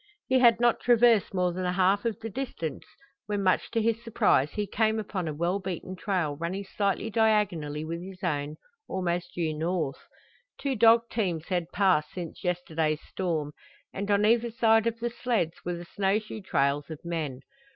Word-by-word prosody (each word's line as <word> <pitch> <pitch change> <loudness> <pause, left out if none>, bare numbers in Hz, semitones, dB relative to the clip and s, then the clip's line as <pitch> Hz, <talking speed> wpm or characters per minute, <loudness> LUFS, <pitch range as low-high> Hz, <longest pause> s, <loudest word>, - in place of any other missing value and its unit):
He 260 0 +3
had 235 -2 +6
not 240 -1 +3
traversed 235 -3 +4
more 180 -2 0
than 185 +1 -3
a 180 0 0
half 190 +3 +2
of 230 -2 -1
the 225 - -4
distance 230 - -4 0.4
when 205 -1 -1
much 185 -1 +2
to 230 - 0
his 230 +1 0
surprise 150 - +2
he 210 - -1
came 220 +2 +1
upon 195 -5 -3
a 155 - -2
well 175 +5 0
beaten 185 0 -5
trail 180 -6 -1
running 170 +6 -3
slightly 200 +2 -1
diagonally 180 -10 +1
with 165 +1 -4
his 190 +1 -10
own, 150 -3 -1 0.3
almost 175 -1 -2
due 165 -3 -1
north. 160 -2 -2 0.6
Two 275 -2 -1
dog 230 +1 +5
teams 180 -8 -2
had 175 -2 -1
passed 185 -7 +2
since 175 0 -7
yesterday's 165 -4 -1
storm, 160 -6 -2 0.4
and 200 +1 -4
on 205 0 +3
either 235 +2 +3
side 225 -1 +3
of 230 0 -2
the 240 0 -2
sleds 230 -9 -1
were 175 0 -2
the 170 0 -8
snow 195 +3 +1
shoe 215 0 -7
trails 140 -5 0
of 160 +1 -9
men. 155 -6 -3
185 Hz, 180 wpm, -28 LUFS, 165-220 Hz, 0.6 s, had